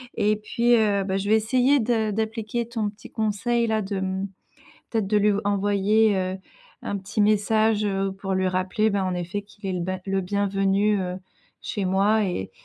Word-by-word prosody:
et 210 +1 +2
puis, 235 +3 +2
heu, 205 -3 +2
bah, 190 0 -1
je 200 +1 -3
vais 215 - +6
essayer 255 +5 +3
de 225 -2 +1
d'appliquer 220 +2 -2
ton 225 -3 -2
petit 205 +1 -13
conseil 225 +2 0
là. 220 -1 +1
De 195 -1 -3
mmh 190 +1 -2 0.6
peut-être 220 -4 0
de 210 +1 +2
lui 210 0 +3
envoyer, 205 +1 +2
heu, 185 0 -2 0.5
un 200 - -2
petit 195 +2 -6
message, 215 +1 +3
heu, 195 -1 0
pour 195 0 -4
lui 185 0 +1
rappeler, 185 +4 0
bah, 200 -1 0
en 185 -1 -1
effet 180 +3 -3
qu'il 205 0 -15
est 190 - -1
le 180 - -2
ben 185 +1 -3
le 195 0 0
bienvenu, 200 +1 +1
heu, 180 -1 -3 0.5
chez 200 -3 -3
moi 200 +4 +3
et 175 - -3
205 Hz, 190 wpm, -24 LUFS, 195-220 Hz, 0.6 s, vais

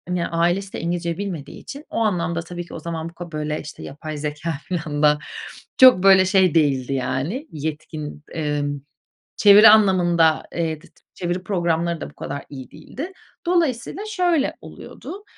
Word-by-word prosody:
ya 170 -1 -1
ailesi 175 +4 0
de - - -4
İngilizce 170 0 -2
bilmediği 185 -8 -6
için 285 +2 -10
o - - -5
anlamda 170 -6 0
tabii 175 +1 -7
ki - - -13
o - - -6
zaman 165 0 -5
bu - - -18
ka 175 0 -9
böyle 150 0 -3
işte 150 - -10
yapay 150 +2 -7
zekâ 150 +2 -3
filan 155 -4 -3
da 150 0 +5 0.6
çok 255 -8 +8
böyle 190 -1 +7
şey 185 -3 +3
değildi 140 -4 +2
yani 135 - -2
yetkin. 150 0 -6
Emm, 145 -2 -2 0.6
çeviri 210 +1 +8
anlamında, 175 -6 +4
eee, 160 -2 -2
dıt - - -19 0.2
çeviri 175 0 -3
programları 170 -3 -1
da - - -5
bu - - -19
kadar 140 0 -6
iyi 130 -3 -9
değildi. 325 +8 -8 0.3
Dolayısıyla 340 - 0
şöyle 355 -8 +1
oluyordu: 400 +2 -10
170 Hz, 160 wpm, -22 LUFS, 150-195 Hz, 0.6 s, çok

